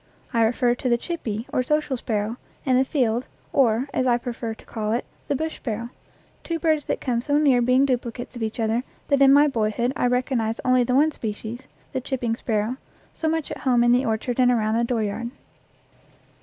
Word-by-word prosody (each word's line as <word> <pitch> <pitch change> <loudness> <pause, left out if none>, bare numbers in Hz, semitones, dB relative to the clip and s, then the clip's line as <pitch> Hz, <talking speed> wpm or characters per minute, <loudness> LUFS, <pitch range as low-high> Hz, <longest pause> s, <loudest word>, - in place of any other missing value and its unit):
I 230 - +3
refer 240 +2 +3
to 250 +1 -2
the 235 - +4
"chippie," 235 - -4
or - - +2
social 300 +1 0
sparrow, 220 -1 -2 0.3
and 260 -2 +3
the 260 - +5
field, 250 -3 0 0.3
or, 250 -1 +3
as 255 - +1
I 240 -1 +4
prefer 235 -2 -5
to - - -18
call 215 -1 -2
it, 240 - -1 0.2
the 285 - 0
bush 315 +3 -3
sparrow 235 0 -4 0.5
two 335 - -2
birds 315 -3 +1
that - - -1
come 240 -3 -1
so 285 +4 +1
near 275 -5 +4
being 255 +3 +4
duplicates 245 -1 -3
of 240 - -7
each 220 +1 -3
other 225 +2 +1 0.3
that 280 -1 +3
in 270 0 +8
my 290 +2 +7
boy 225 -6 +1
hood 240 +4 -1
I - - +1
recognized 245 -3 0
only 255 -1 +4
the 250 +1 0
one 305 +3 +4
species, 225 +1 -6 0.3
the 260 - -1
chip 265 0 -3
ping 230 -2 0
sparrow, 225 +1 -1 0.4
so 320 - -1
much 320 -1 -2
at - - -5
home 245 -3 +3
in 240 - +4
the 250 +2 +4
orchard 230 +3 -1
and 250 -1 +5
around 220 -3 +2
the 235 - +2
dooryard. 235 -1 -1
245 Hz, 210 wpm, -24 LUFS, 230-265 Hz, 0.5 s, in